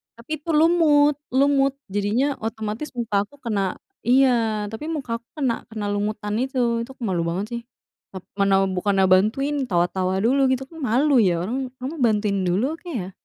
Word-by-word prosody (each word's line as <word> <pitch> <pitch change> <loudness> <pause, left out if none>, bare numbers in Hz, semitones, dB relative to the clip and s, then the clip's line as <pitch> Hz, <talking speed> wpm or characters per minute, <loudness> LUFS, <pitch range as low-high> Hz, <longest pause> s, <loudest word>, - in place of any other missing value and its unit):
tapi 235 +6 -15
itu 330 - -10
lumut, 300 -3 +4
lumut. 275 0 +3 0.2
Jadinya 205 +6 +1
otomatis 220 +4 -4
muka 230 -4 -2
aku 285 - -19
kena 200 -5 -1 0.3
iya, 235 -5 +3
tapi 225 +7 -6
muka 265 -7 -3
aku 235 - -45
kena, 270 -6 +1 0.2
kena 215 -2 -5
lumutan 210 0 -2
itu. 245 -3 0
Itu 235 - -11
aku - - -10
malu 185 -6 0
banget 185 +5 -2
sih, 235 0 -3 0.5
tap 190 -2 -8 0.2
mana 195 -1 +4 0.2
bukannya 195 +1 +2
bantuin, 250 +10 +2
tawa 175 -4 +2
tawa 185 0 -1
dulu 265 +4 +3
gitu 260 0 0
kan 325 - -13
malu 275 +6 +2
ya 175 - +2
orang, 235 +7 -2 0.2
kamu 265 +5 -5
bantuin 210 -2 +1
dulu 185 +7 +1
kek 345 -1 -9
ya? 185 0 -5
230 Hz, 175 wpm, -23 LUFS, 205-275 Hz, 0.5 s, lumut